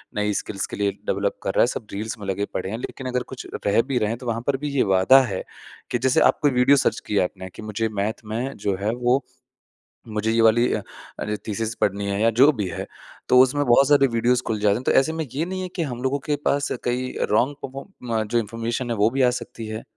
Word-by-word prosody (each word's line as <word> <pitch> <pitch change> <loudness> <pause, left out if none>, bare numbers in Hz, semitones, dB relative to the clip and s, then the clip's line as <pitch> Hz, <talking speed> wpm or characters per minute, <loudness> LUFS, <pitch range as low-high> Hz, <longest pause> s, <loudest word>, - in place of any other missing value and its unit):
नई 105 0 0
स्किल्स 100 0 -3
के - - -7
लिए 100 0 0
डेवलप 100 +1 -1
कर 95 - -1
रहा - - +5
है। - - +3
सब 115 -3 -5
रील्स 110 +3 -4
में 100 - -7
लगे 100 +1 -1
पड़े 95 - -3
हैं। 110 - -3
लेकिन 130 +1 -6
अगर 125 0 -1
कुछ 125 - -8 0.2
रह 100 +3 +4
भी 130 +1 -2
रहे 105 -3 +1
हैं, 115 - -2
तो 125 - -11
वहाँ 115 0 -1
पर 140 -1 +2
भी 145 +2 -4
ये 135 - +4
वादा 130 +9 +6
है 100 -7 -3 0.5
कि - - +2
जैसे 130 -1 +3
आप - - -27
कोई 145 -2 +3
वीडियो 125 +3 +5
सर्च - - +1
की 105 - -3
है - - +4
आपने 95 +1 -5
कि - - -9
मुझे 110 +1 -2
मैथ 110 +2 -3
में 115 +5 -3
जो 100 -1 -1
है, 105 - +1
वो 125 +2 +1 0.8
मुझे 110 0 -1
ये 115 - +3
वाली 115 +2 +4
अ - - -1 0.4
अ, 105 - -2
थीसिस 110 +1 -2
पढ़नी 100 0 +1
है 100 - -1
या 115 - +5
जो 140 +3 +8
भी 105 -7 -2
है, - - -5 0.4
तो 125 - +7
उसमें 130 +3 +3
बहुत 125 +3 +5
सारे 145 -2 +5
वीडियोज़ 120 +1 +1
खुल 110 -2 -1
जाते 105 -1 +3
हैं। 120 - -4
तो - - +2
ऐसे 155 +4 0
में 160 -1 -3
ये 150 +5 -1
नहीं 185 +1 -4
है 185 - -3
कि 175 - -1
हम 125 -5 -5
लोगों 135 +2 0
के 145 - +3
पास 140 0 +1
कई 125 +1 -1
अ, - - -1
रॉन्ग 130 +7 +2
पर्फॉर्म 130 - -4
जो 120 +2 +1
इन्फॉर्मेशन 115 +3 -3
है, - - 0
वो 105 +2 +4
भी 135 +3 -1
आ 125 - +5
सकती 115 - -8
है? 110 +1 -5
115 Hz, 260 wpm, -23 LUFS, 105-130 Hz, 0.8 s, जो